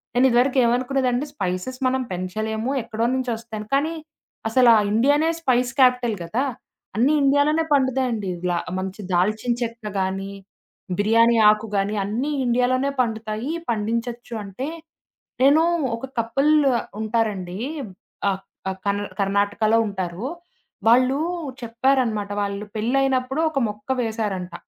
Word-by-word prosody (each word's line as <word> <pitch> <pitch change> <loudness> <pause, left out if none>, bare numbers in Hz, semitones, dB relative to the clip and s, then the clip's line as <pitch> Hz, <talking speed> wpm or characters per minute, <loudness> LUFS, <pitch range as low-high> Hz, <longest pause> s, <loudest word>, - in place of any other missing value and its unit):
నేను 255 +2 +5
ఇదివరకు 250 +2 +3
ఏమనుకున్నదంటే, 255 +2 +1
స్పైసెస్ 190 +2 -3
మనం 260 0 +1
పెంచలేము 215 +6 -3
ఎక్కడో 225 0 -2
నుంచి 260 -1 -2
వస్తాయని 220 -2 -8
కానీ, 310 +4 0 0.5
అసలా 240 0 +6 0.2
ఇండియానే 285 +8 +3
స్పైస్ 250 -4 +2
క్యాపిటల్ 250 -3 +4
కదా! 220 +10 -1 0.5
అన్ని 260 +7 +4
ఇండియాలోనే 285 +3 +3
పండుతాయండి. 260 -7 +1 0.2
లా 175 - +1 0.2
మంచి 190 +2 -5
దాల్చిన 215 +7 +1
చెక్కగానీ, 195 -4 -3 0.7
బిర్యానీ 230 +3 +4
ఆకు 215 +1 +1
గాని 200 +2 0
అన్నీ 240 +9 -2
ఇండియాలోనే 250 +3 +2
పండుతాయి, 220 +2 -3 0.2
పండించొచ్చు 235 +2 -3
అంటే, 200 +7 -5 0.8
నేనూ 290 +4 +6 0.3
ఒక 230 - -6
కపుల్ 275 +7 +2 0.5
ఉంటారండి. 210 -5 -1 0.7
ఆహ్, 190 0 -4 0.3
ఆ - - -1
కర్ణ్ 205 +1 0
కర్ణాటకలో 205 +3 +2
ఉంటారు. 190 +2 -4 0.6
వాళ్ళూ 255 +3 +4 0.4
చెప్పారన్నమాట, 235 -3 0
వాళ్ళు 200 0 -3
పెళ్ళైనప్పుడు 260 +4 +1
ఒక 295 - -2
మొక్క 210 +2 -9
వేశారంట. 210 -6 -3
230 Hz, 110 wpm, -23 LUFS, 210-255 Hz, 0.8 s, అసలా